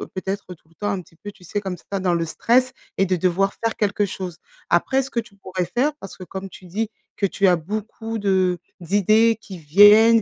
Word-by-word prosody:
peut-être, 190 +1 -4
tout 160 - -34
le 165 - -25
temps, 205 +3 -2
un 200 -2 -2 0.2
peu 205 - -6
tu 180 - -21
sais, 205 +4 -3
comme 190 -3 -4
ça, 195 +3 -5
dans 180 -2 +1
le 165 -1 0
stress 250 +10 +2 0.2
et 195 - +3
de 185 0 +1
devoir 185 +3 +1
faire 225 - 0
quelque 205 0 +1
chose. 185 -3 -6 0.3
Après, 265 0 +3
ce 270 - -9
que 240 - 0
tu 225 -3 -8
pourrais 185 -2 -3
faire, 255 - 0
parce 195 - -10
que 185 - -9
comme 190 +1 -7
tu 185 - -14
dis 210 +5 -2 0.3
que 200 - 0
tu 195 +1 +1
as 180 - +5
beaucoup 215 +5 -5
de 190 -3 +2 0.2
d'idées 215 +5 +3
qui 190 -3 -9
viennent, 205 +8 +7
195 Hz, 225 wpm, -22 LUFS, 185-215 Hz, 0.3 s, viennent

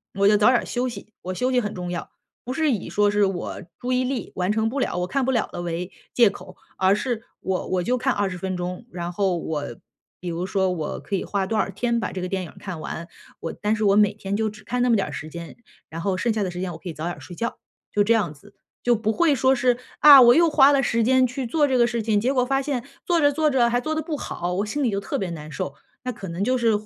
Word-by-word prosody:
我 200 0 +3
就 210 - +6
早 210 +4 +5
点 250 - +2
休 250 +1 -1
息， 215 -1 -10
我 185 +1 -4
休 255 +5 0
息 250 -1 +3
很 210 0 -4
重 180 -1 -4
要。 175 - -5 0.3
不 250 - -4
是 310 0 +2
以 205 -6 -2
说 205 0 +2
是 205 0 +3
我 190 -3 -4 0.2
注 250 - -4
意 255 0 +2
力 250 -5 -3
完 180 +2 0
成 220 +1 +1
不 280 - -3
了， 255 - -1
我 180 - 0
看 275 +3 0
不 265 - +1
了 235 -4 +1
的， 175 - -5
为 175 +1 -4 0.2
借 235 -4 +6
口。 200 - -11 0.2
而 190 +1 +4
是 230 0 -2 0.2
我 190 -1 -2
我 180 -1 0
就 250 +4 +1
看 260 +1 +1
20 195 -3 -1 0.2
钟， 180 +5 -5
然 175 -4 -5
后 190 -1 +1
我 155 -3 -3 0.6
比 180 - -4
如 170 +2 -3
说 190 -1 +1
我 160 -4 -3
可 - - -9
以 - - -4
花 195 -2 -1
多 220 +2 -1
少 195 - +1
天 235 +4 -1
把 - - -3
这 185 - -4
个 180 - -3
电 190 -1 -2
影 - - -12
看 185 -5 -6
完， 170 +2 -6 0.3
我 165 - -3
但 210 +1 -1
是 220 - -2
我 200 -1 +4
每 210 -1 +5
天 200 -1 -3
就 220 -1 0
只 210 0 -13
看 245 +4 -2
那 250 - +3
么 230 - +5
点 190 -7 -1
时 150 +2 -6
间， 170 +1 -9 0.3
然 165 +1 -6
后 190 +2 0
剩 230 +5 0
下 215 - -1
的 190 - 0
时 180 +1 -5
间 185 -2 -2
我 - - -7
可 185 - -11
以 165 - -4
早 155 +2 -6
点 175 - -5
睡 175 - -10
觉， 230 +4 -3 0.3
就 205 - +2
这 225 +3 +3
样 200 -9 +1
子。 200 +8 -19 0.3
就 240 -1 +3
不 220 0 0
会 310 +3 +3
说 260 +2 +3
是， 250 -1 +2 0.2
啊， 285 -3 +10
我 240 0 +8
又 335 0 +5
花 285 -1 +6
了 275 -1 +3
时 230 -2 +1
间 260 +2 +4
去 255 +1 -4
做 290 +5 +2
这 260 -2 +2
个 240 - +5
事 235 -1 -1
情， 210 -2 +1
结 255 +3 +1
果 250 -1 +2
发 270 +1 +1
现 265 -3 -3 0.2
做 345 -2 +2
着 290 -1 +4
做 305 0 +2
着 240 -3 +3
还 245 +1 +1
做 310 +3 -2
得 315 - -1
不 315 0 -4
好， 180 -10 -4
我 195 +3 0
心 290 +8 -3
里 255 - +2
就 200 -1 -2
特 - - -3
别 190 - -2
难 155 -2 -8
受。 140 -1 -4 0.3
那 250 - -2
可 195 -4 -8
能 170 +3 -5
就 255 0 +2
是 230 -2 +3
215 Hz, 305 characters per minute, -24 LUFS, 185-250 Hz, 0.6 s, 啊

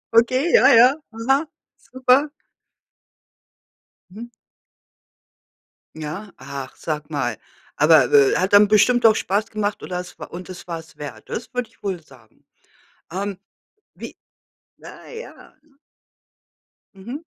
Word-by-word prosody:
Okay, 255 +8 +3
ja, 260 - +6
ja, 250 +4 +7 0.2
aha, 270 +7 +1 0.3
super. 255 +4 +1 1.8
Mhm. 230 +5 -9 1.7
Ja? 160 +7 -7
Ach, 140 0 -8
sag 150 -1 -5
mal. 120 -7 -2 0.4
Aber 150 -4 +5
be 140 -2 +5
hat 185 +2 -1
dann 205 0 +7
bestimmt 235 +3 +3
doch 220 -1 +7
Spaß 200 +2 -1
gemacht 210 -1 -3
oder 180 -1 -4
es 180 - -11
wa - - -7
und 180 +2 -9
es 185 -1 -10
war 170 -2 -4
es 160 0 -15
wert. 130 -8 -9
Das 235 - -6
würde 250 -2 -3
ich - - -30
wohl 190 -4 -3
sagen. 125 -7 -22 0.7
Ähm, 195 0 -4 0.6
wie - - -9 0.6
na - - -13
ja 465 0 -11 1.4
Mhm. 240 - -8
200 Hz, 125 wpm, -21 LUFS, 155-240 Hz, 1.8 s, ja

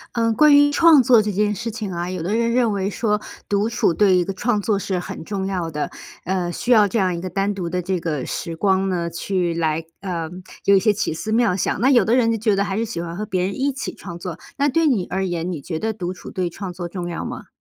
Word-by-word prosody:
呃， 230 -1 +2
关 295 +5 +6
于 290 0 +6
创 315 -3 +6
作 235 -2 +6
这 210 - -2
件 210 +2 +1
事 230 +3 -4
情 215 -3 -5
啊， 175 0 -3
有 185 -3 -4
的 195 +6 -1
人 235 0 +1
认 240 -2 +3
为 195 -1 -1
说， 210 0 0 0.3
独 205 +2 +1
处 230 -6 +1
对 195 +1 +4
于 - - +4
一 - - +2
个 195 - -4
创 210 +2 0
作 205 -1 0
是 190 -1 -2
很 175 -2 -6
重 195 0 -3
要 185 -4 -2
的， 150 -1 -3 0.3
呃， 180 -1 -1
需 245 - -2
要 215 -4 +6
这 215 - -2
样 185 -4 +2
一 170 - -4
个 185 +2 -5
单 195 +3 0
独 180 -4 -4
的 180 +1 -1
这 185 +1 -1
个 155 -5 -3
时 165 - -4
光 190 +2 +2
呢， 175 -3 -1
去 175 0 -1
来 160 -1 0 0.2
呃， 175 -4 -4 0.3
有 200 - +4
一 195 - +6
些 215 +2 +3
奇 205 -5 -1
思 215 +7 -3
妙 230 -4 +3
想； - - 0
那 260 - +4
有 245 - +5
的 230 - +3
人 235 -3 +3
就 225 - 0
觉 215 -1 +1
得 200 - +1
还 195 0 -2
是 230 - 0
喜 210 -6 -4
欢 170 0 -6
和 210 - -3
别 185 -3 -1
人 195 +4 -3
一 275 +1 +1
起 270 - -5
创 175 -3 -9
作。 175 -1 -6 0.2
那 285 +1 +2
对 325 +4 +2
你 220 -11 +2
而 190 +1 -1
言， 175 0 -2
你 155 - -5
觉 160 +2 -4
得 220 +4 -1
独 185 -4 -4
处 180 - -10
对 185 -3 -2
创 190 +2 -6
作 175 0 -5
重 175 0 -5
要 170 - -4
吗？ - - -7
195 Hz, 300 characters per minute, -21 LUFS, 175-220 Hz, 0.3 s, 关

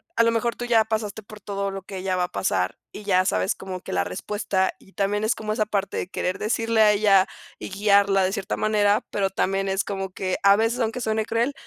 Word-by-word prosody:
a - - +4
lo 230 - +3
mejor 230 +1 0
tú 245 - -5
ya 230 -2 +4
pasaste 220 -1 -3
por 210 +1 -12
todo 200 0 -3
lo 195 -1 -6
que 195 0 -8
ella 185 0 -1
va 180 -1 +1
a - - -6
pasar, 95 -1 -1
y 210 - -9
ya 185 -2 +3
sabes 95 - +1
como 190 -1 -6
que - - -7
la 90 -1 +2
respuesta, 190 - -1
y 195 - -21
también 205 +1 0
es 220 +1 +2
como 215 -1 -3
esa 215 0 0
parte 200 -2 -2
de - - -2
querer 185 -1 -2
decirle 225 +1 +1
a 210 -1 +7
ella 200 -2 +4 0.3
y - - -6
guiarla 200 0 +3
de 185 +1 0
cierta 200 -1 -3
manera, 210 -1 +2
pero 195 -1 0
también 195 0 -1
es 190 +1 0
como 195 -1 -4
que, 185 0 -2
a 200 0 +7
veces, 225 +3 +1
aunque 230 +1 -1
suene 220 -1 0
cruel, 230 +5 0
200 Hz, 240 wpm, -24 LUFS, 190-220 Hz, 0.3 s, a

